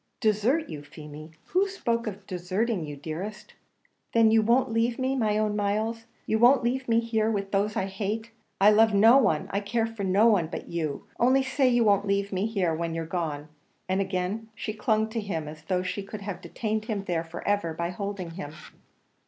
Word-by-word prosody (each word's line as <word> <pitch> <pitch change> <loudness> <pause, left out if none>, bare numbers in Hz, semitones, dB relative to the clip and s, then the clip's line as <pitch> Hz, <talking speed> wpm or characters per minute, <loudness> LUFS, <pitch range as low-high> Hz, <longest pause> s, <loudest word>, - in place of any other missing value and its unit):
"Desert 230 +9 +2
you, 150 - -7
Feemy! 150 +1 -11 0.2
who 380 +2 +2
spoke 235 - -2
of 205 -1 -6
deserting 185 +3 -1
you, 145 -1 -7
dearest?" 175 +9 -6 0.6
"Then 225 -1 +5
you 225 0 +5
won't 235 +2 +2
leave 230 +1 +1
me, 260 +1 0
my 215 -5 +1
own 215 -1 0
Myles? 215 +3 -1 0.2
You 220 - +1
won't 245 +3 +6
leave 255 +1 -1
me 230 0 +4
here 225 -2 0
with 200 -2 -2
those 205 +1 +1
I 190 - 0
hate! 210 +4 -4 0.3
I 200 +2 +7
love 220 0 +5
no 225 +6 +7
one 160 - +1
I 200 - 0
care 225 +3 0
for 225 -2 -6
no 195 +3 +3
one 200 -8 +4
but 165 - -7
you; 155 -4 -3
only 260 +2 +4
say 265 0 +2
you 240 -1 +3
won't 205 -1 +3
leave 200 0 0
me 190 +3 0
here 190 -7 0
when 165 0 -2
you're 165 0 -3
gone!" 155 -3 -3 0.4
and 190 +1 +1
again 195 +4 -2
she 215 - -4
clung 220 0 +1
to 225 +1 -3
him 165 -8 -3
as 155 0 -10
though 180 +1 0
she 185 +2 -3
could 200 +1 -8
have 200 -2 -5
detained 215 -1 -3
him 210 -3 -3
there 170 -4 -1
for 165 0 -8
ever 205 -5 +1
by 170 +2 -3
holding 195 -2 -5
him. 165 -4 -7
205 Hz, 205 wpm, -27 LUFS, 180-225 Hz, 0.6 s, I